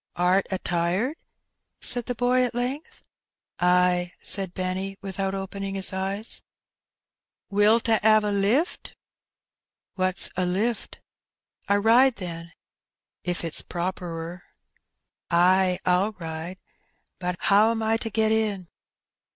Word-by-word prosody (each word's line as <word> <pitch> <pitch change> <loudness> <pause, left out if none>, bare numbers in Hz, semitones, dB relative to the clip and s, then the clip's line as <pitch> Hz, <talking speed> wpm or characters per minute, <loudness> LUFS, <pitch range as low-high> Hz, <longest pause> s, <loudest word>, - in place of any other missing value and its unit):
^^Art 180 +2 +3
a 190 - -1
tired 180 - -1 0.3
?'* - - -56
said 245 -2 +2
the 245 - -2
boy 250 +1 +2
at 245 -1 -2
length. 255 +5 -4 0.5
"Ay," 180 0 +2
said 190 -3 -1
Benny, 190 +1 -2
without 195 0 -3
opening 195 0 -5
his 195 0 +2
eyes. 195 +3 -3 1.1
'^Wilt 210 +3 +4
a 225 -1 +4
*ave 215 -1 +5
a - - 0
lift?" 205 - 0 0.6
" - - -53
What^s 185 0 +1
a 185 - 0
lift? 205 +6 -2 0.2
" - - -66
" - - -27
A 200 0 +4
ride, 235 +4 +5
then, 170 -3 -7 0.7
if 175 -1 -1
it^s 165 -2 0
properer." 175 -1 -4 0.5
" - - -59
Ay, 180 +1 +4
ril 185 +4 +2
ride; 165 0 -6 0.6
but 180 -1 -2 0.2
'oVm 220 +3 +4
I 220 +1 +2
to 225 - -4
get 220 0 +1
in 210 -5 0
195 Hz, 135 wpm, -25 LUFS, 180-220 Hz, 1.1 s, ave